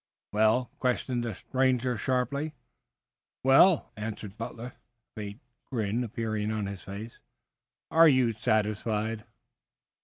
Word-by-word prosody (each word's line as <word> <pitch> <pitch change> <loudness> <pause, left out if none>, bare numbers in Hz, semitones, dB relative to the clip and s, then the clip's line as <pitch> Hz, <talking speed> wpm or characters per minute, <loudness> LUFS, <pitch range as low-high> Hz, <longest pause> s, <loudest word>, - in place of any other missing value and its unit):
"Well?" 110 +4 +3
questioned 125 -1 0
the 115 -4 -3
stranger 130 +1 +1
sharply. 140 +6 -1 0.9
"Well?" 135 +6 +5
answered 105 -1 -6
Butler, 115 +1 -6
a - - -34 0.4
faint 105 +2 -7 0.3
grin 115 -1 0
appearing 110 -2 -2
on 110 -2 -1
his 100 -1 -6
face. 105 +4 -8 0.7
"Are 165 0 +7
you 130 -4 +3
satisfied?" 110 0 0
115 Hz, 110 wpm, -29 LUFS, 105-125 Hz, 0.9 s, Are